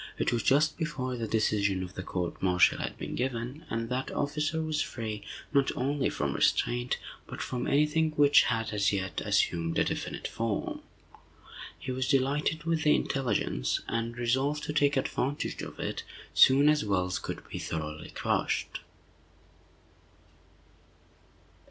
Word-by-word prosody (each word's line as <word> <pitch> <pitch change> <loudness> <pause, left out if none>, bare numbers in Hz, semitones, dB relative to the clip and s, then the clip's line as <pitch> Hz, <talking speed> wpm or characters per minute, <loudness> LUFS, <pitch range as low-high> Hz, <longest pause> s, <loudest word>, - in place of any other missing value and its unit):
It - - +1
was 120 - +1
just 150 +7 +3
before 130 -6 -2
the 115 -2 -3
decision 105 -3 +1
of 90 0 -8
the - - -5
court 90 -1 -4
martial 90 -3 +4
had - - -4
been - - -5
given, 125 +3 -3
and 115 0 -2
that 130 +1 -2
officer 150 +2 -1
was 155 -1 -1
free, 110 -3 -4 0.3
not 140 -2 +3
only 140 +2 0
from - - -2
restraint, 120 +1 +1 0.3
but - - -8
from 125 -1 -3
any 145 +2 +4
thing 160 +1 +1
which 145 -1 +6
had, 115 -2 -1
as 105 0 +2
yet, 95 -4 -2
assumed 85 -1 +1
a - - +4
definite - - -3
form. 115 -3 -2 1.0
He 130 - -5
was 130 0 -1
delighted 140 +4 +1
with 165 -1 0
the 150 -1 +5
intelligence, 115 - 0
and 115 +1 -2
resolved 130 +5 0
to 150 - -3
take 145 -1 +3
advantage 135 +1 -1
of - - -8
it - - -3 0.3
soon 140 +2 +7
as 150 0 +4
Wells 90 -3 0
could - - -6
be - - -6
thoroughly 75 -1 -5
crushed. - - -1
125 Hz, 150 wpm, -29 LUFS, 105-145 Hz, 1.0 s, soon